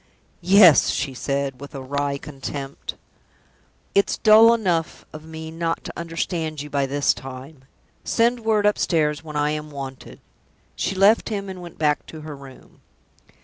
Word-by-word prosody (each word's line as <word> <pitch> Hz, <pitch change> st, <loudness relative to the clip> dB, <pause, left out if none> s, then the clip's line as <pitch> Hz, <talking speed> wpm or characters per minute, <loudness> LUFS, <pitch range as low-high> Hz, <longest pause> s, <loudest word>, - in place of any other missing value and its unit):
"Yes," 185 Hz, -3 st, +7 dB
she 135 Hz, -, -2 dB
said, 140 Hz, 0 st, -3 dB
with 140 Hz, 0 st, -10 dB
a 135 Hz, -, -5 dB
weary 140 Hz, +1 st, -2 dB
contempt. 140 Hz, -1 st, -7 dB, 1.0 s
"It's 200 Hz, -, +2 dB
dull 220 Hz, +1 st, +7 dB
enough 180 Hz, -8 st, -1 dB
of 155 Hz, 0 st, -10 dB
me 160 Hz, 0 st, -8 dB
not 165 Hz, 0 st, -2 dB
to -, -, -7 dB
understand 165 Hz, -2 st, -3 dB
you 145 Hz, +1 st, -7 dB
by 140 Hz, -1 st, 0 dB
this 145 Hz, +1 st, +1 dB
time. 135 Hz, +2 st, -10 dB, 0.4 s
Send 240 Hz, +1 st, +2 dB
word 220 Hz, -2 st, +1 dB
upstairs 160 Hz, -7 st, +1 dB
when 155 Hz, -1 st, -9 dB
I 150 Hz, 0 st, +1 dB
am 150 Hz, 0 st, -4 dB
wanted." 135 Hz, -2 st, -8 dB, 0.6 s
She 195 Hz, -, -2 dB
left 200 Hz, +5 st, +4 dB
him, 200 Hz, -2 st, -3 dB
and 185 Hz, -1 st, -8 dB
went 175 Hz, -2 st, -11 dB
back 150 Hz, -1 st, 0 dB
to 155 Hz, -, -10 dB
her 150 Hz, -1 st, -8 dB
room. 135 Hz, -1 st, -15 dB
155 Hz, 155 wpm, -22 LUFS, 140-180 Hz, 1.0 s, Yes